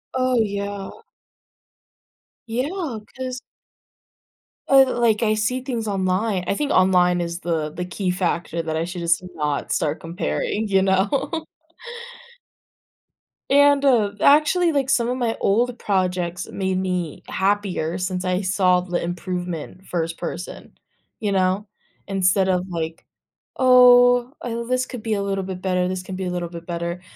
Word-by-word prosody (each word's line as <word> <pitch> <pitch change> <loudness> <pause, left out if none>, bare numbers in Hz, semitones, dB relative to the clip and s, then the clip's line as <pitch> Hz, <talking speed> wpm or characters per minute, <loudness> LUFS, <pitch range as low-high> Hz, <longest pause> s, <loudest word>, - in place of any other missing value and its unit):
Oh, 255 -1 +2
yeah. 200 -1 -3 1.6
Yeah, 265 - -3 0.2
'cause 255 -1 -5 1.3
uh, 270 -2 +5
like, 230 -2 +2
I 215 -1 +3
see 220 +4 -1
things 240 -4 -3
online 190 0 0
I - - +1
think 290 +6 -1
online 180 -1 +4
is 170 0 -3
the 165 -3 -1
the 175 +4 -5
key 180 +1 -2
factor 175 -2 -1
that 160 -1 -3
I 165 - -1
should 175 0 -6
just 170 0 +2
not 150 -2 -2
start 155 +1 -1
comparing, 190 +5 -2
you 195 -1 +4
know? 200 - 0 2.1
And, 285 0 +5
uh, 235 -7 +3
actually, 310 +4 +4
like, 275 -3 0
some 245 -3 +2
of 250 - -1
my 235 -3 0
old 240 +4 +1
projects 180 -3 -1
made 190 -1 -2
me 180 -4 -3
happier 190 -4 -1
since 185 0 -2
I 185 0 0
saw 185 -2 +3
the 180 -1 -3
improvement 180 0 -5
first 165 -2 -3
person, 180 - -7 0.4
you 210 -3 -1
know? 190 +2 +1 0.4
Instead 190 -1 +2
of 180 -1 +1
like, 165 -2 -5 0.5
"Oh, 245 0 +6
uh, 235 -1 -3
this 255 +1 0
could 250 -5 -8
be 225 - -1
a 200 - 0
little 195 -1 -2
bit 185 -1 -6
better, 180 -1 0
this 185 0 -3
can 185 0 -7
be 190 - -3
a 180 - -2
little 175 -1 -3
bit 170 0 -9
better." 170 +1 -4
190 Hz, 150 wpm, -22 LUFS, 180-240 Hz, 2.1 s, Oh